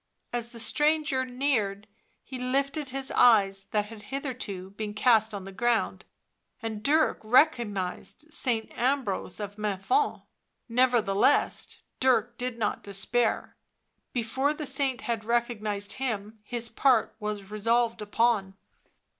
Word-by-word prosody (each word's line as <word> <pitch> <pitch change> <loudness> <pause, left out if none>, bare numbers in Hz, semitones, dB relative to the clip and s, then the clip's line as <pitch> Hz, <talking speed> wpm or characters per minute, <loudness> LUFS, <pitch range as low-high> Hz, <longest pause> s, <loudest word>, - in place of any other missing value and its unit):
As 235 -1 -1
the 235 -1 -11
stranger 295 +1 +1
neared 245 -6 -1 0.4
he 260 -1 -7
lifted 275 +3 -1
his 270 +1 -2
eyes, 195 -5 +4
that 210 0 0
had 215 0 -11
hitherto 240 -9 -5
been 210 0 -5
cast 220 -1 +4
on 200 -2 -5
the 195 - -8
ground, 215 -3 0 0.5
and 225 -3 -5
Dirk 310 +7 +3
recognised 235 - +1
Saint 235 -8 -1
Ambrose 245 -8 -1
of 205 0 -6
Menthon. 210 - 0 0.4
Never 245 -1 +3
theless 195 0 +2 0.2
Dirk 245 -2 +2
did 250 -1 -3
not 215 -3 -1
despair; 215 +4 -1 0.6
before 260 +5 0
the 300 - -5
saint 270 -2 0
had 230 -3 -2
recognised 215 -3 -1
him 220 -4 -3
his 235 +2 -3
part 250 -1 +2
was 210 -2 -5
resolved 230 +2 +1
upon. 210 -2 +1
230 Hz, 125 wpm, -28 LUFS, 210-260 Hz, 0.6 s, eyes